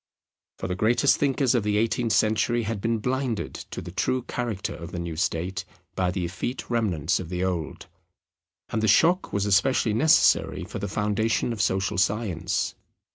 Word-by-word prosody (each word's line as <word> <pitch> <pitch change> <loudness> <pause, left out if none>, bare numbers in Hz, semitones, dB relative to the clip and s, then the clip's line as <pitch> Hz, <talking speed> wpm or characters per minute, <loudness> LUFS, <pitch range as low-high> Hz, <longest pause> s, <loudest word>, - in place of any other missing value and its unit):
For - - -4
the 90 - -2
greatest 120 +8 +3
thinkers 135 -2 +2
of 120 - +2
the 105 0 0
eighteenth 115 +1 +1
century 110 +2 +2
had 110 -2 -3
been 115 +1 +1
blinded 125 0 -2 0.2
to - - -6
the 90 - -8
true 125 +7 0
character 115 -7 -3
of 85 +2 -8
the 90 - -5
new 85 -2 -4
state 90 +3 -1 0.3
by 90 -1 0
the 90 -1 -2
effete 105 +9 -5
remnants 95 -10 +1
of 90 -3 -6
the 90 0 -2
old. 85 -7 -3 0.8
And 110 - -1
the 110 - +1
shock 170 - +4
was 100 0 0
especially 105 +3 +2
necessary 155 +9 +3
for - - -6
the 100 - -3
foundation 105 +3 0
of 110 - -3
social 95 -2 0
science. 100 -3 0
105 Hz, 175 wpm, -25 LUFS, 95-120 Hz, 0.8 s, shock